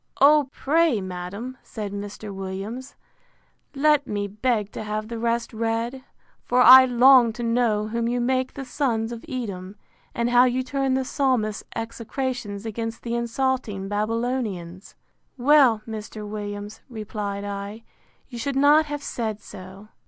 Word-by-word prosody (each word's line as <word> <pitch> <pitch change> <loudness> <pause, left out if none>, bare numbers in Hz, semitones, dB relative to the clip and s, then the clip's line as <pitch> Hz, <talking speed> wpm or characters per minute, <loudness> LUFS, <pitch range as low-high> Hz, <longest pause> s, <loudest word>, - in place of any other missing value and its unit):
O 290 -1 +6
pray, 310 -4 +2
madam, 190 +7 -6
said 210 -3 -6
Mr. 205 0 -6
Williams, 195 +8 -6 0.8
let 290 0 +3
me 205 -1 -2
beg 210 0 -1
to - - -6
have 215 +1 -4
the 230 -1 -5
rest 235 0 -1
read; 230 +3 -2 0.4
for 250 - +1
I 260 +1 +10
long 250 -1 +6
to 240 - -6
know 230 -3 +1
whom 230 +1 -1
you 245 +1 0
make 255 +1 0
the 275 - -6
Sons 240 -4 -1
of 235 -1 -7
Edom, 200 -7 -5 0.4
and 235 +1 0
how 245 +1 +6
you 255 +1 0
turn 270 0 0
the 265 0 0
Psalmist's 250 -7 0
execrations 230 -2 -4
against 225 +1 -5
the 235 - -3
insulting 235 -4 -1
Babylonians. 210 -4 -3 0.4
Well, 255 -4 +5
Mr. 215 -1 -7
Williams, 205 0 -6
replied 210 -3 -5
I, 205 +2 -6 0.4
you 240 -3 -8
should 275 +4 -2
not 295 +3 +5
have 290 -1 -5
said 220 -3 -3
so. 195 +1 -12
230 Hz, 145 wpm, -24 LUFS, 210-255 Hz, 0.8 s, I